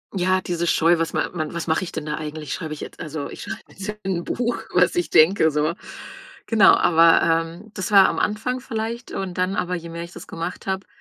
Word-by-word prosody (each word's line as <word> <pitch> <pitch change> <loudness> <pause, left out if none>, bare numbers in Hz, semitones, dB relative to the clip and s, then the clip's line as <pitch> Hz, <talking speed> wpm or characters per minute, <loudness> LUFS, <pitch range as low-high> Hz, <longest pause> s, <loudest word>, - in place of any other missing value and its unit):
Ja, 185 0 +2
diese 175 -2 -2
Scheu, 165 +1 +3
was 165 - -1
ma - - -1
man 155 -2 -3
was 170 -1 -4
mache 160 +3 +1
ich 170 - -6
denn 150 - -5
da 150 0 -2
eigentlich? 155 -1 -5
Schreibe 160 -3 -5
ich 150 - -8
jetzt - - -9
also 155 -2 -5
ich - - -9
schreibe - - -6
jetzt 195 +1 -8
in 190 -1 -1
'n - - -6
Buch, 240 0 -2
was - - +3
ich 350 - 0
denke, 160 -1 +5
so. 150 +3 0 0.7
Genau, 220 -4 +6
aber, 165 0 +5 0.4
ähm, 220 0 -16
das 190 +1 -4
war 195 -2 +8
am - - -1
Anfang 245 +4 -1
vielleicht 230 +2 -5
und 190 -2 -4
dann 185 +2 0
aber, 180 0 -1
je 170 -1 -7
mehr 170 0 -6
ich 170 - -11
das - - -10
gemacht 170 +2 -6
habe, 190 0 -3
175 Hz, 235 wpm, -22 LUFS, 165-195 Hz, 0.7 s, war